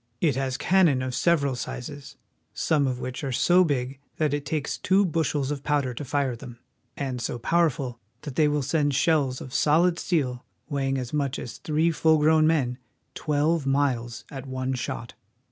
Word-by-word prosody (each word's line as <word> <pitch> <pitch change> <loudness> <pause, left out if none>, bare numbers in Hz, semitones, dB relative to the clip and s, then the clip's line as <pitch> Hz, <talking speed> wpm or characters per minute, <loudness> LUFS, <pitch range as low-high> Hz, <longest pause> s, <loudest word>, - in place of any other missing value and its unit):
It 150 -6 +2
has 135 -1 -1
cannon 170 -9 +3
of 130 -1 -3
several 140 -4 +2
sizes, 125 +3 -7 0.4
some 150 -4 +2
of 130 -1 -1
w^hich 125 +3 -5
are 135 - -2
so 175 +8 +4
big 135 -4 -2 0.2
that 155 -3 +1
it 145 -1 -3
takes 150 -2 -2
two 195 +2 +3
bushels 155 -5 0
of 145 -2 -3
pow 145 -1 +2
der 130 -2 -4
to 120 - -6
fire 140 -2 -1
them, 120 0 -10 0.4
and 130 -3 -3
so 120 - -3
powerful 135 -3 0 0.2
that 145 -3 -6
they 155 - +4
will 145 -1 0
send 145 0 +1
shells 140 -5 +2
of 130 - -9
solid 170 +3 +3
steel, 130 -8 -1 0.2
weighing 135 -3 -1
as 125 0 -5
much 140 -2 0
as 120 -2 -7
three 160 +2 +1
full 160 0 +3
grown 155 +1 +4
men, 135 -6 +1 0.3
twelve 150 0 0
miles 125 -4 0
at 135 -1 -7
one 130 0 -2
shot. 120 -2 -4
140 Hz, 180 wpm, -26 LUFS, 130-155 Hz, 0.4 s, so